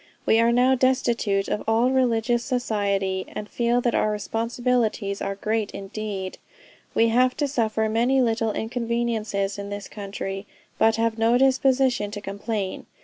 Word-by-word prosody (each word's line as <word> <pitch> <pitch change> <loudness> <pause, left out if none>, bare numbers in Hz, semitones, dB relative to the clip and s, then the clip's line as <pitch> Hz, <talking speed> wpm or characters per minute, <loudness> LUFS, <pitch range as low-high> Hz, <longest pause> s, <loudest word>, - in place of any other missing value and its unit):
We 225 - +4
are 230 +1 +4
now 250 +2 +4
destitute 240 -6 +1
of 210 - -2
all 230 +3 +3
religious 240 -2 +1
society, 200 -7 -1
and 210 - -6
feel 240 +2 +1
that 240 -1 0
our 215 - +2
responsibilities 225 -1 -1
are 195 - -2
great 215 +1 -1
indeed.... 195 -1 -5 0.6
We 230 0 +4
have 250 +2 +3
to 290 - +1
suffer 220 -4 0
many 240 +5 +2
little 225 -3 +1
inconveniences 225 -4 -2
in 200 0 -6
this 205 0 -6
country, 195 -1 -6 0.3
but 220 0 +4
have 225 0 0
no 230 +2 +4
disposition 265 -4 +2
to 205 0 -6
complain. 200 0 -4
225 Hz, 145 wpm, -24 LUFS, 205-245 Hz, 0.6 s, We